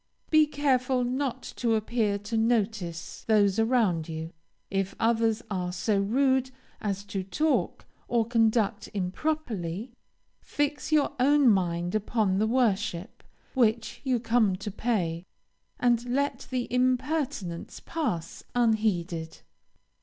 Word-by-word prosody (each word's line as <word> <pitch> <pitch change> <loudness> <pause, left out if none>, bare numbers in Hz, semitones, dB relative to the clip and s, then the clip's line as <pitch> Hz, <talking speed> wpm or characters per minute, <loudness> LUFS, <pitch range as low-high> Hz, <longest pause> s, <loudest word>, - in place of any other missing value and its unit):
Be 310 -1 +6
careful 260 -3 +1
not 255 +1 -2
to 230 -2 +2
appear 215 -1 0
to 205 +3 -5
notice 220 -7 -1
those 205 -2 +3
around 225 -9 +2
you. 160 0 -5 0.4
If 195 0 -1
others 225 0 +2
are 180 -2 -2
so 200 +3 0
rude 260 +5 +2 0.3
as 200 -1 -2
to 200 -1 -4
talk 240 - 0 0.2
or 235 -2 +2
conduct 225 -2 +1
improperly, 205 - -2 0.5
fix 290 +1 -2
your 305 -2 +3
own 280 0 +5
mind 175 -2 0
upon 215 -2 +1
the 215 - +2
worship 210 -7 0 0.3
which 230 -3 +1
you 255 -3 +1
come 225 -4 +2
to 205 +2 -6
pay, 185 -7 -1 0.6
and 240 -1 +3
let 280 +3 -1
the 255 -2 -2
impertinence 255 - -1
pass 220 - -3
unheeded. 195 -8 0
225 Hz, 115 wpm, -27 LUFS, 195-250 Hz, 0.6 s, Be